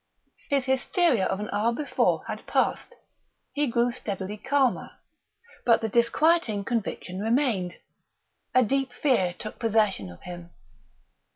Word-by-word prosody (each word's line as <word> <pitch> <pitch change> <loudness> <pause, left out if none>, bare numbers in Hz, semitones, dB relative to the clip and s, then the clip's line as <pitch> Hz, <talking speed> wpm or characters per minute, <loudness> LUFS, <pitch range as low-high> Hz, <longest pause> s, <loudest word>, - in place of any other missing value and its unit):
His 275 -2 +1
hysteria 265 - +2
of 190 - -2
an 210 - -4
hour 215 +3 +2
before 285 +5 0
had - - -7
passed; - - 0 0.6
he 295 0 +1
grew 240 0 +1
steadily 200 -4 -4
calmer; 270 +3 0 0.7
but 230 -1 +4
the 225 - -1
disquieting 235 -1 +2
conviction 200 -5 -3
remained. 225 -6 +1 0.8
A 255 - +6
deep 270 +1 0
fear 245 -10 +1
took 215 - -7
possession 210 - +1
of 85 - -13
him. 175 -1 -8
230 Hz, 125 wpm, -26 LUFS, 200-265 Hz, 0.8 s, A